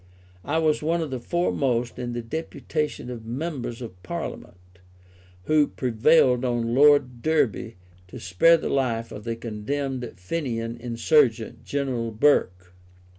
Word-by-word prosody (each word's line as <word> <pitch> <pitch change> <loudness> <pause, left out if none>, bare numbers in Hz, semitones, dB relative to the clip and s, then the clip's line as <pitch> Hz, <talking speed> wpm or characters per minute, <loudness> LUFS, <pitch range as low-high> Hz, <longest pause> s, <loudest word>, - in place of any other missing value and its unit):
I - - -1
was 155 -2 +2
one 165 +3 0
of 155 -4 -4
the 130 - -3
foremost 125 -6 -1
in 120 -1 -4
the 120 0 -4
deputation 150 0 -4
of 115 -2 -7
Members 125 -1 -4
of 90 -6 -10
Parliament 90 +1 -8 0.6
who 150 +5 +3
prevailed 125 +1 +3
on 120 -2 -1
Lord 140 -3 +4
Derby 130 -7 0 0.3
to - - -10
spare 165 - +4
the - - -4
life 115 -4 -1
of 105 - -9
the 115 -1 -2
condemned 125 +3 -4
Fenian 115 - -3
insurgent, 120 0 +1
General 130 -5 -2
Burke. 90 -7 +1
125 Hz, 130 wpm, -25 LUFS, 115-145 Hz, 0.6 s, Lord